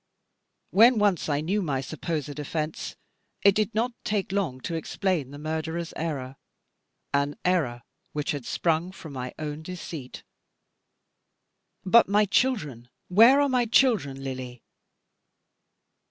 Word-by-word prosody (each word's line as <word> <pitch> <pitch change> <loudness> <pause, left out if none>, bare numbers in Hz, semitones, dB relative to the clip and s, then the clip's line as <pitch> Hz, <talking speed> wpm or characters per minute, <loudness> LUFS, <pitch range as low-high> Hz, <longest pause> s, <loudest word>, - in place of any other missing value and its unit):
When 230 +4 +6
once 205 -7 +2
I 145 0 +1
knew 195 +7 0
my 145 -7 -1
supposed 150 +1 -4
offence, 155 +1 -4 0.5
it 200 - +7
did 215 +2 -1
not 235 +3 +1
take 200 -3 -1
long 185 -10 -1
to 170 - -4
explain 165 -2 -1
the 145 - -9
murderer's 160 +2 -3
error, 135 -5 -4 0.8
an 140 +1 +1
error 145 -10 +1 0.3
which 150 -1 -2
had 145 -3 -4
sprung 165 +1 0
from 160 -5 -10
my 125 -1 -5
own 150 0 -5
deceit. 160 -6 -8 1.6
But 225 +2 +6
my 210 +1 +4
children, 170 - 0 0.2
where 230 +9 +7
are 285 - +4
my 250 -2 +2
children, 200 - +2
Lily? 130 -3 -6
160 Hz, 125 wpm, -26 LUFS, 140-200 Hz, 1.6 s, it